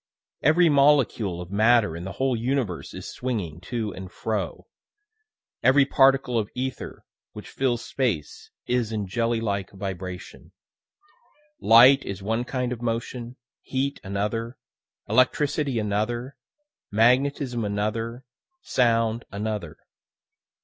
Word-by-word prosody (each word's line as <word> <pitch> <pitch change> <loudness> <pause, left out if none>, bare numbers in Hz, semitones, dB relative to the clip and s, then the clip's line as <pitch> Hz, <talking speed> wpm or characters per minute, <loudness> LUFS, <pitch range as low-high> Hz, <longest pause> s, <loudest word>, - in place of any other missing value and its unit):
Every 170 +5 +5
molecule 140 - +3
of 90 +1 -9
matter 110 -3 +3
in 85 +2 -6
the 95 - -6
whole 130 -1 0
universe 120 -6 -2
is - - -7
swinging 100 -11 -4
to 110 +1 -4
and 95 0 -9
fro; 110 +3 -3 1.0
every 135 +1 +5
particle 135 -3 +3
of 105 -1 -3
ether 130 +1 -5 0.3
which - - -9
fills 120 -3 -1
space 110 - -3 0.2
is 120 -3 0
in 105 -2 -2
jelly 115 +4 0
like 100 -4 -2
vibration. 95 -2 -7 1.1
Light 130 +4 +7
is 95 -1 -6
one 115 +4 -1
kind 125 -1 -2
of 120 - -9
motion, 120 +1 -4 0.3
heat 140 +1 -2
another, 105 +5 -3 0.5
electricity 135 +3 +2
another, 115 +5 -2 0.5
magnetism 125 +2 +2
another, 110 +4 -3 0.4
sound 115 -1 +1
another. 105 -5 -4
115 Hz, 115 wpm, -25 LUFS, 105-130 Hz, 1.1 s, Light